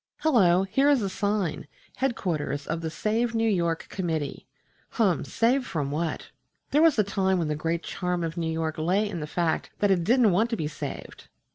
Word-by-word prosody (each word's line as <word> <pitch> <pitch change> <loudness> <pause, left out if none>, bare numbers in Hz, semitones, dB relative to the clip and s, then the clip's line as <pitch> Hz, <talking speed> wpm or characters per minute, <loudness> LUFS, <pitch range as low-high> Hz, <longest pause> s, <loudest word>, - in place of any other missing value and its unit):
Hullo! 190 - +4
here 270 +9 +2
is 275 -6 +3
a 195 - -1
sign, 200 -7 -1 0.3
"Headquarters 170 - -2
of 165 +1 -3
the 160 - -3
Save 225 +7 -1
New 225 0 +2
York 170 -5 0
Committee." 160 -6 -3 0.5
Hum! 205 -7 +2
Save 245 +2 +1
from 145 -5 -2
what? 160 +2 -3 0.4
There 295 - +4
was 325 -5 +5
a 215 - +4
time 190 -1 +1
when 165 -3 -1
the 150 - 0
great 165 +2 -2
charm 180 -2 -2
of 165 0 -3
New 165 -2 -2
York 160 -1 -2
lay 190 +7 +1
in 190 -5 -5
the 150 - -5
fact 165 +1 -1
that 205 -1 +2
it 180 -3 +2
didn't 235 +1 +4
want 215 +7 +2
to 230 - -2
be 155 - -2
saved. 150 - -7
185 Hz, 195 wpm, -26 LUFS, 165-220 Hz, 0.5 s, was